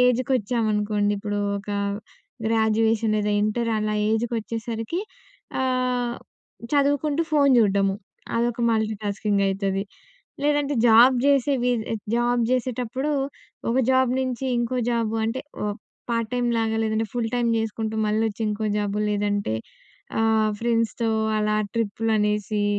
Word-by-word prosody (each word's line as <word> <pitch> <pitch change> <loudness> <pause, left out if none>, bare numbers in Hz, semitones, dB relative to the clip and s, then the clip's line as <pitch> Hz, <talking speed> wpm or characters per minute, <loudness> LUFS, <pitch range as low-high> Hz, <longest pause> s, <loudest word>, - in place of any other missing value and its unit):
ఏజ్‍కొచ్చామనుకోండి. 220 -4 +1
ఇప్పుడు 205 0 -2 0.2
ఒక 205 +1 -8 0.8
గ్రాడ్యుయేషన్ 220 0 +2
లేదా 210 0 0
ఇంటర్ 230 +2 0
అలా 215 0 -1 0.2
ఏజ్‌కొచ్చేసరికి 225 - -2 0.6
ఆహ్, 250 -2 0 0.6
చదువుకుంటూ, 285 +2 +2
ఫోను 280 -3 +5
చూడడము. 195 -3 +3 0.4
అదొక 235 0 0
మల్టీటాస్కింగ్ 210 -2 0
అయితది. 195 0 -1 0.6
లేదంటే 290 -1 +1
జాబ్ 235 +3 +7
జేసే 280 0 +3
వీ 250 - +3 0.4
జాబ్ 240 +1 +2
జేసేటప్పుడు 255 +2 -1 0.6
ఒక 235 - 0
జాబ్ 260 -1 +4
నుంచి 255 0 -2
ఇంకో 240 +1 -1
జాబ్ 230 -2 0
అంటే 230 +4 -2 0.2
ఒ - - 0 0.4
పార్ట్ 230 -2 0
టైమ్‌లాగా 230 -2 0
లేదంటే 220 0 0
ఫుల్ 235 -2 -1
టైమ్ 240 -1 +1
చేసుకుంటూ 220 0 -2
మళ్ళొచ్చి 215 +1 0
ఇంకో 210 +1 -2
జాబ్ 205 -1 -1
లేదంటే 205 - 0 0.7
ఆహ్, 220 -1 +3
ఫ్రెండ్స్‌తో 230 0 0 0.3
అలా 215 0 +1 0.2
ట్రిప్పులు 225 0 -1
అనేసి, 210 0 0
225 Hz, 115 wpm, -24 LUFS, 215-245 Hz, 0.8 s, జాబ్